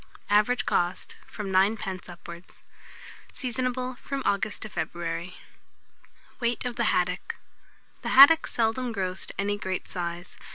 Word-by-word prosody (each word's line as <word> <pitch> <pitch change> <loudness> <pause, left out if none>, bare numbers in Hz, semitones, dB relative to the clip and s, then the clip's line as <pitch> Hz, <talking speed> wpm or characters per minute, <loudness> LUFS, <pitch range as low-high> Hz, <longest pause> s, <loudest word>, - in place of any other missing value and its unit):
Average 215 +4 +3
cost, 175 +1 -1
from 205 -3 -6
9d. 190 -1 +1
upwards. 170 0 -11 0.7
Seasonable 255 0 -2
from 275 -1 -4
August 200 +1 0
to 215 - -6
February. 170 -1 -4 1.0
WEIGHT 240 -1 -1
OF 245 -1 -2
THE 235 - 0
HADDOCK. 180 -2 0 0.7
The - - -3
haddock 285 +5 +8
seldom 235 +1 0
grows 185 -2 -3
to - - -12
any 205 +1 0
great 190 -2 -3
size. 175 0 -5
205 Hz, 125 wpm, -27 LUFS, 180-245 Hz, 1.0 s, haddock